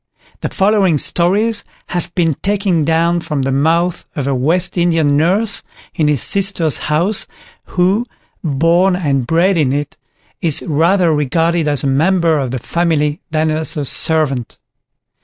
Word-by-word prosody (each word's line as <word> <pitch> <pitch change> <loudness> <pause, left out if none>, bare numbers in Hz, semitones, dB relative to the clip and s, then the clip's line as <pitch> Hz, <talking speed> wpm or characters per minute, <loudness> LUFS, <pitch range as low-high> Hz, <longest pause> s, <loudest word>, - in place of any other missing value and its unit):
The - - -3
following 195 -5 +2
stories 200 +9 +2 0.3
have 175 -1 -4
been 165 -4 +1
taken 195 -5 0
down 165 +2 +1
from 150 -4 -3
the 135 - -1
mouth 165 +6 0
of 145 - -3
a 140 - 0
West 165 +8 0
Indian 165 -5 +1
nurse 200 +7 +1 0.3
in 155 -4 0
his 145 -5 0
sister's 190 -6 +3
house, 175 +7 0 0.4
who, 190 +7 0 0.4
born 170 +5 +2
and 140 -8 -1
bred 170 +4 +2
in 140 -4 +1
it, 145 +1 -3 0.4
is 160 -4 0
rather 165 +2 +2
regarded 160 +3 0
as 145 -2 0
a - - -2
member 160 +3 +2
of 135 -2 -2
the 130 - -3
family 155 - -1
than 155 0 0
as 155 0 -3
a 145 - -2
servant. 140 -5 -1
165 Hz, 150 wpm, -15 LUFS, 150-180 Hz, 0.4 s, sister's